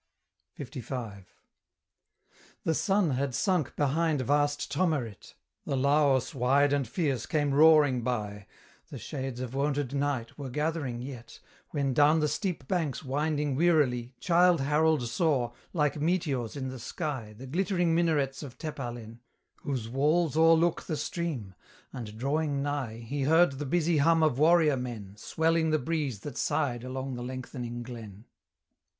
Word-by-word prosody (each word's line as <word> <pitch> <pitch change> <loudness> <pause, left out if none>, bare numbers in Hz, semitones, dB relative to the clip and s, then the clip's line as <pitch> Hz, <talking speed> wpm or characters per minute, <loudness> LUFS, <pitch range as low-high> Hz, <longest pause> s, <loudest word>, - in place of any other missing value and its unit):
LV. 115 -6 -6 1.4
The 165 - +1
sun 195 -1 +2
had 135 0 -1
sunk 180 -8 0
behind 150 +1 +1
vast 145 +2 0
Tomerit, 145 - -2 0.3
The 135 - 0
Laos 140 0 +2
wide 140 +2 +3
and 140 -3 0
fierce 135 - -1
came 145 -3 0
roaring 150 -4 +6
by; 105 -4 -3 0.4
The - - -7
shades 130 -3 -5
of 130 -1 -5
wonted 140 -1 -1
night 140 -3 -2
were 140 -2 -5
gathering 145 -3 -2
yet, 125 -3 -9 0.3
When, 140 -3 -1
down 150 +4 +5
the 155 - +2
steep 160 -4 -3
banks 160 -6 -1
winding 145 +1 -1
wearily 135 -6 +2
Childe 175 -2 +4
Harold 150 0 +2
saw, 130 -3 +1 0.2
like 150 -3 0
meteors 150 -9 -1
in 130 -1 -3
the 130 -1 -7
sky, 130 -5 -5
The 130 - -9
glittering 175 +3 0
minarets 155 -5 +1
of 140 -5 -9
Tepalen, 120 -6 -6 0.4
Whose 135 -8 -4
walls 150 +5 +1
o'erlook 165 +1 +4
the 155 - -4
stream; 145 - -4 0.4
and 110 -4 -7
drawing 140 +2 -1
nigh, 135 -6 -3
He 140 +5 -3
heard 160 -2 +4
the 145 - -3
busy 170 +1 +2
hum 165 +2 +4
of 145 -4 +2
warrior 155 -2 +5
men 115 -6 -6
Swelling 160 +7 +1
the 155 - +3
breeze 145 -7 -2
that 145 -4 -7
sighed 125 -6 0
along 130 +1 -4
the 120 -1 -5
lengthening 125 -1 -6
glen. 115 -4 -10
140 Hz, 145 wpm, -29 LUFS, 125-155 Hz, 1.4 s, roaring